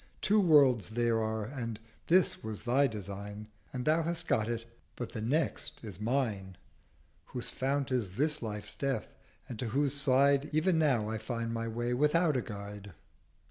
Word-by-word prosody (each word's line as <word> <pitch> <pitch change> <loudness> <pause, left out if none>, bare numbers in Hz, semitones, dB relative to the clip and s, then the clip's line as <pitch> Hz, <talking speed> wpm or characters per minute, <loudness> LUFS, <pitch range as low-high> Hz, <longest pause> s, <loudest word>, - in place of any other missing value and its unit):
Two 210 +2 +3
Worlds 140 - +5
there 115 0 +1
are, 110 -1 -1
and 115 -3 -5 0.3
This 185 +1 +3
was 110 -2 -5
thy 135 +3 +3
Design, 105 -1 -7 0.2
And 125 -1 -4
thou 155 +2 +4
hast 170 +1 -2
got 110 +1 +1
it; 115 -1 -3 0.3
but 120 - -5
The 110 - -5
Next 140 +5 -1
is 100 -5 -8
mine; 105 -6 -1 0.7
Whose 125 -2 -5
Fount 135 +1 -1
is 110 -8 -1
this 150 +1 +1
life's 105 -1 -5
Death, 135 -1 -2 0.4
and 115 - -7
to 125 - -2
whose 140 +4 +1
Side 140 +1 +3
Ev'n 165 +1 +3
now 130 -9 +2
I 110 0 -2
find 115 +1 -3
my 115 0 -2
Way 120 +2 -1
without 150 +4 +3
a 125 - +2
Guide.' 100 -2 -8
120 Hz, 170 wpm, -31 LUFS, 110-140 Hz, 0.7 s, Worlds